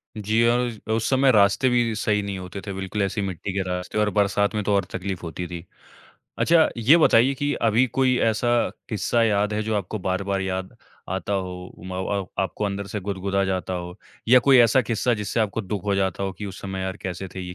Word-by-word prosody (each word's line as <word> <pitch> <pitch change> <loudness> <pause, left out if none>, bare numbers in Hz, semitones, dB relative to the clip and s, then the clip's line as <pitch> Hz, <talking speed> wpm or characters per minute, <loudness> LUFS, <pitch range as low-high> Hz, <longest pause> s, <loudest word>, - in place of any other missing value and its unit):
जी, 110 +2 +1
औज 120 -2 0 0.2
उस 115 - -1
समय 135 0 +4
रास्ते 105 +4 +4
भी 120 -2 +2
सही 105 -1 0
नहीं 100 -1 -4
होते 90 +2 -7
थे 100 - -3
बिल्कुल, 95 +2 -3
ऐसी 100 +2 -1
ही 100 - -2
मिट्टी 95 +1 -5
के 95 - 0
रास्ते 90 +3 -4
और 105 0 +2
बरसात 100 +1 +1
में 105 - -1
तो 100 +1 0
और 100 - +1
तकलीफ़ 95 -1 -4
होती 85 +1 -5
थी। 85 0 -8 0.7
अच्छा, 165 -1 +4
ये 120 +8 +5
बताइए 135 -4 +4
कि 145 +2 -1
अभी 115 +3 +2
कोई 130 0 +1
ऐसा 115 +2 -1 0.4
किस्सा 110 +2 0
याद 105 -1 +2
है, 105 +1 -1
जो 110 0 -2
आपको 105 +2 -3
बार-बार 95 +1 -1
याद 95 0 -4 0.3
आता 95 +2 -3
हो 90 -2 -2 0.2
उम 90 +2 -9
अ - - -4
अ, 100 0 -2 0.2
आपको 95 +2 -3
अंदर 100 0 -3
से 105 +1 -4
गुदगुदा 100 0 -1
जाता 95 -1 -2
हो 90 +1 -6 0.3
या 125 +2 +8
कोई 135 0 +5
ऐसा 120 +2 +5
किस्सा 115 +2 0
जिससे 105 +1 -2
आपको 110 +1 0
दुःख 100 -1 -5
हो 100 -1 +1
जाता 95 0 -1
हो 95 -1 -2
कि 105 +2 -7
"उस 95 - -8
समय 95 -1 -4
यार 95 +1 -3
कैसे 95 0 -6
थे, 95 - -8
ये 90 -1 -7
100 Hz, 225 wpm, -24 LUFS, 95-115 Hz, 0.7 s, या